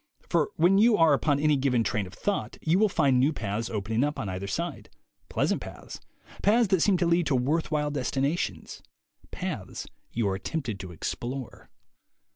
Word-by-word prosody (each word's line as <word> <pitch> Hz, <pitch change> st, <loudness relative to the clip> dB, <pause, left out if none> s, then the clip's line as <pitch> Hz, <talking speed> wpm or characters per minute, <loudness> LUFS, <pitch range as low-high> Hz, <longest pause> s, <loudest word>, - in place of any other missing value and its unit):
For 165 Hz, -4 st, +2 dB
when 180 Hz, +4 st, +4 dB
you 220 Hz, 0 st, +5 dB
are 165 Hz, -3 st, +5 dB
upon 140 Hz, +1 st, +2 dB
any 150 Hz, 0 st, +3 dB
given 130 Hz, -4 st, +2 dB
train 105 Hz, -4 st, -1 dB
of 90 Hz, -, -13 dB
thought, 205 Hz, -1 st, -2 dB
you 165 Hz, +4 st, +3 dB
will 215 Hz, 0 st, +4 dB
find 135 Hz, -7 st, +3 dB
new 135 Hz, +4 st, +4 dB
paths 110 Hz, -4 st, -3 dB
opening 110 Hz, +3 st, -1 dB
up 150 Hz, +1 st, -1 dB
on 100 Hz, -, -3 dB
either 95 Hz, +1 st, -4 dB
side, 95 Hz, -, -4 dB, 0.4 s
pleasant -, -, 0 dB
paths, -, -, -9 dB, 0.4 s
paths 220 Hz, +1 st, +4 dB
that 190 Hz, -3 st, +3 dB
seem 195 Hz, 0 st, +4 dB
to 175 Hz, -, +1 dB
lead 170 Hz, 0 st, +2 dB
to 140 Hz, -, +2 dB
worth 145 Hz, +7 st, 0 dB
while 150 Hz, -1 st, 0 dB
destinations, 140 Hz, +3 st, -2 dB, 0.5 s
paths -, -, -5 dB, 0.3 s
you 115 Hz, -3 st, 0 dB
are 95 Hz, 0 st, -1 dB
tempted 120 Hz, -7 st, -4 dB
to 95 Hz, -1 st, -7 dB
explore. 120 Hz, -, -5 dB
140 Hz, 180 wpm, -27 LUFS, 115-170 Hz, 0.5 s, you